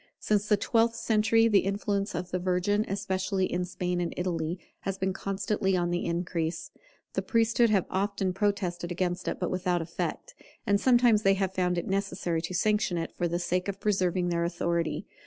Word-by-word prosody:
Since 210 -1 +1
the 210 - +4
twelfth 230 +2 +2
century, 225 0 +3
the 205 -3 +5
influence 200 +1 -1
of 180 - -4
the 185 - 0
Virgin, 185 +3 +1
especially 190 -1 -1
in 180 0 -1
Spain 180 0 -2
and 170 - -3
Italy, 170 -1 -1 0.2
has 195 -1 -3
been 190 0 -1
constantly 195 0 -1
on 175 0 0
the 175 - -1
increase. 170 -1 -2 0.4
The - - 0
priesthood 230 0 +3
have 200 -4 +2
often 195 -1 -1
protested 185 -3 -1
against 180 0 -2
it, - - -2
but - - -1
without 180 -1 0
effect; 165 0 -4 0.3
and 200 0 +2
sometimes 240 -4 +5
they 195 -1 +4
have 190 -1 -1
found 180 -1 0
it 170 - -2
necessary 195 -4 -1
to 165 +2 -5
sanction 210 -2 +1
it, 165 -1 -4
for 175 - 0
the 170 +1 -1
sake 180 +1 -1
of 200 0 -4
preserving 185 -3 +1
their 170 -1 0
authority. 170 -1 -1
185 Hz, 185 wpm, -28 LUFS, 175-205 Hz, 0.4 s, the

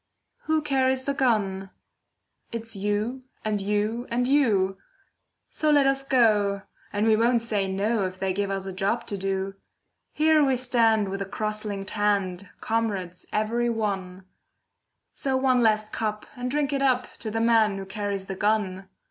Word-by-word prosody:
Who 315 -1 +1
carries 265 -2 +1
the 280 - 0
gun? 205 -8 0 0.8
It's 225 -1 -5
you, 210 +6 -1 0.2
and 210 -2 0
you, 210 +4 -1
and 245 +1 0
you; 205 -9 +2 0.7
So 310 - 0
let 290 -2 +5
us 270 0 +2
go, 210 -7 +3 0.3
and 205 +1 0
we 220 -1 +5
won't 230 +1 +2
say 210 -4 0
no 200 +2 0
If 185 0 -9
they 190 0 -1
give 200 +1 -1
us 195 -1 -3
a 190 - -5
job 200 +5 -1
to 200 - -4
do. 195 0 -2 0.6
Here 310 0 +4
we 270 -2 +3
stand 230 -4 +2
with 195 +1 -4
a 195 - -3
cross 215 +1 -2
linked 200 -1 -4
hand, 200 -3 0
Comrades 200 -6 -2
every 235 +3 0
one; 195 -5 -3 0.9
So 265 -2 -1
one 260 -1 +3
last 215 -2 +2
cup, 215 -1 -2
and 250 0 -3
drink 290 +1 0
it 275 - 0
up 255 -2 +1
To 220 - -5
the 225 +1 -2
man 225 -3 +3
who 195 - -5
carries 200 -1 -3
the 190 - -5
gun! 195 -2 -1
215 Hz, 165 wpm, -26 LUFS, 195-245 Hz, 0.9 s, let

